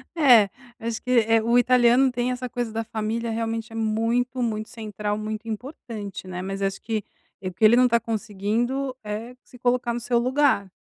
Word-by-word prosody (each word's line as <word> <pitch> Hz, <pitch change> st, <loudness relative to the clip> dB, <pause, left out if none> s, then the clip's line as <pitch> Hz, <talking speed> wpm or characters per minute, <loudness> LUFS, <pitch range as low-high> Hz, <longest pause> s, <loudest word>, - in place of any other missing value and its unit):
É, 245 Hz, -10 st, +6 dB, 0.3 s
acho 230 Hz, 0 st, -3 dB
que, 250 Hz, -, -4 dB, 0.2 s
eh, 225 Hz, 0 st, +4 dB
o 235 Hz, +2 st, +3 dB
italiano 250 Hz, +1 st, +5 dB
tem 245 Hz, 0 st, -1 dB
essa 250 Hz, 0 st, -4 dB
coisa 240 Hz, -2 st, -3 dB
da 225 Hz, +1 st, -2 dB
família 225 Hz, +1 st, -3 dB
realmente 225 Hz, 0 st, -3 dB
é -, -, -9 dB
muito, 230 Hz, +3 st, 0 dB
muito 220 Hz, -2 st, -2 dB
central, 210 Hz, -3 st, -4 dB
muito 215 Hz, +1 st, -5 dB
importante, 220 Hz, -, -7 dB
né, 180 Hz, -1 st, -5 dB
mas 195 Hz, +1 st, -4 dB
acho 195 Hz, 0 st, -1 dB
que, 220 Hz, -2 st, -2 dB, 0.4 s
eh, 185 Hz, -, -3 dB
porque 190 Hz, +5 st, +2 dB
ele 225 Hz, -, +7 dB
não 250 Hz, +1 st, +5 dB
tá 235 Hz, 0 st, +3 dB
conseguindo 230 Hz, +4 st, -2 dB
é 215 Hz, +4 st, -5 dB
se 250 Hz, -, -17 dB
colocar 245 Hz, -1 st, +1 dB
no 240 Hz, -, -2 dB
seu 240 Hz, 0 st, 0 dB
lugar, 255 Hz, -5 st, +2 dB
230 Hz, 190 wpm, -24 LUFS, 215-245 Hz, 0.4 s, ele